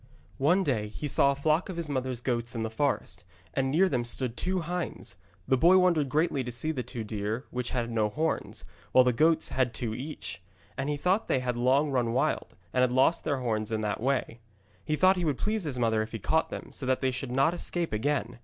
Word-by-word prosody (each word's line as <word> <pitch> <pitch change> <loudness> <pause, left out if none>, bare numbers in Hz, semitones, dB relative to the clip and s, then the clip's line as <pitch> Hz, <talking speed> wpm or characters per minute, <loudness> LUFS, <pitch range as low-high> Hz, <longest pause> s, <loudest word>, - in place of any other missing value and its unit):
One 175 +8 +3
day 115 - 0
he 130 +8 -5
saw 140 0 +4
a - - -2
flock 155 +6 +1
of 185 - -5
his 170 -2 -3
mother's 130 -3 -2
goats 120 -2 -2
in 115 - -2
the 110 - -3
forest, 110 -7 -1 0.3
and 135 0 0
near 170 +8 +4
them 125 -9 0
stood 120 0 -1
two 185 +6 -1
hinds. 175 +1 -4 0.3
The 130 -1 +3
boy 180 +5 +6
wondered 170 -6 +3
greatly 150 -1 +1
to 120 - -5
see 125 +7 0
the 135 -5 -3
two 120 -2 -5
deer 105 +3 -3
which 125 0 -2
had 120 -2 -2
no 110 -2 +1
horns, 160 +9 -2 0.3
while 130 - +7
the 125 -1 +2
goats 160 +5 +3
had 125 -3 0
two 115 -1 -2
each; 125 - -6 0.3
and 135 +2 -2
he 145 - -1
thought 185 +9 +1
they - - +2
had 125 -1 -1
long 135 +5 +2
run 120 -3 +1
wild, 125 - 0 0.2
and 125 - +2
had 125 -1 +3
lost 130 +6 +3
their 140 -4 -1
horns 110 -3 -1
in 110 -1 -1
that 105 0 -2
way. 130 -2 -1 0.4
He 155 - 0
thought 185 +4 +4
he 180 - -1
would 145 -4 0
please 215 -3 -1
his 140 -4 -2
mother 110 -2 +2
if 110 +1 -5
he - - -2
caught 160 +9 +1
them, - - -7
so 130 - -4
that 130 0 +1
they 130 -1 +1
should 125 0 -4
not 135 +6 +3
escape 175 -4 -1
again. 120 0 -1
130 Hz, 235 wpm, -28 LUFS, 120-155 Hz, 0.4 s, while